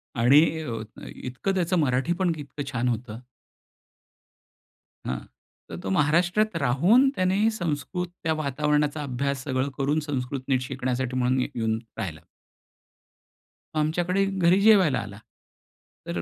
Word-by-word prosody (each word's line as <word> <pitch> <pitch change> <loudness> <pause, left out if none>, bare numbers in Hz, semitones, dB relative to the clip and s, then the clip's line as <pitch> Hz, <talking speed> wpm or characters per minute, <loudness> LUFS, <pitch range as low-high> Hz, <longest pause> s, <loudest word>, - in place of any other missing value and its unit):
आणि 125 +5 +6 0.2
अ, 145 - -5 0.3
अ, - - -9
इतकं 130 +10 -3
त्याचं 180 0 +1
मराठी 135 +2 +1
पण 180 -2 +2
इतकं 145 0 -6
छान 125 0 -1
होतं. 115 -1 -4 1.9
हां, - - -2 0.5
तर - - -6
तो 95 - -3
महाराष्ट्रात 175 - +2
राहून 180 - +4
त्याने 190 +4 +2
संस्कृत 175 -1 -3 0.2
त्या 160 -1 +1
वातावरणाचा 150 0 0
अभ्यास 140 0 -2
सगळं 130 0 -1
करून 145 +3 +1
संस्कृत 135 -3 -3
नीट 130 -2 +2
शिकण्यासाठी 130 -1 -2
म्हणून 130 +1 +2
इथे 125 -2 -4
येऊन 110 0 0 0.2
राहिला. 85 -8 -4 1.6
आमच्याकडे 175 +5 +1
घरी 190 -1 +2
जेवायला 190 -11 +5
आला. 100 +1 -8 0.9
तर 85 0 -2
145 Hz, 125 wpm, -25 LUFS, 125-175 Hz, 1.9 s, आणि